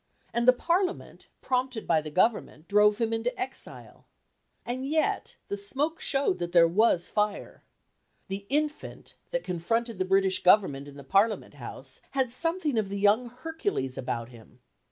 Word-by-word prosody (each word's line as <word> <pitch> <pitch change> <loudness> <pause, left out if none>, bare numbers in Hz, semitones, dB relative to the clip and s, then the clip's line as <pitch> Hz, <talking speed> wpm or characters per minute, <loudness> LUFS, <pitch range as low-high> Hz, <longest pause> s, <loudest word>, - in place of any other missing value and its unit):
And 235 +1 0
the - - +11
Parliament, 355 +7 -2
prompted 255 -3 -1
by 160 -2 +2
the 155 - -7
Government, 180 -2 0
drove 210 0 +4
him 225 -1 0
into 230 +8 -2
exile. 380 - -6 0.6
And 245 +2 -3
yet 315 +1 0
the 200 - -3
smoke 280 +11 0
showed 275 - +1
that 175 0 -4
there 170 -1 +7
was 180 -1 +2
fire. 210 -1 -2 0.6
The 195 +1 -6
infant, 300 +1 -3 0.2
that - - -2
confronted 225 +5 -2
the 185 - +1
British 190 0 +2
Government 180 -8 +4
in 145 - -12
the 140 - -10
Parliament 200 +9 +1
House, - - -9 0.2
had 260 -3 +1
something 325 -2 +1
of 205 -3 -2
the 200 - -3
young 210 +5 +3
Hercules 255 - -3
about 115 -2 -4
him. 120 0 -16
215 Hz, 155 wpm, -28 LUFS, 185-260 Hz, 0.6 s, the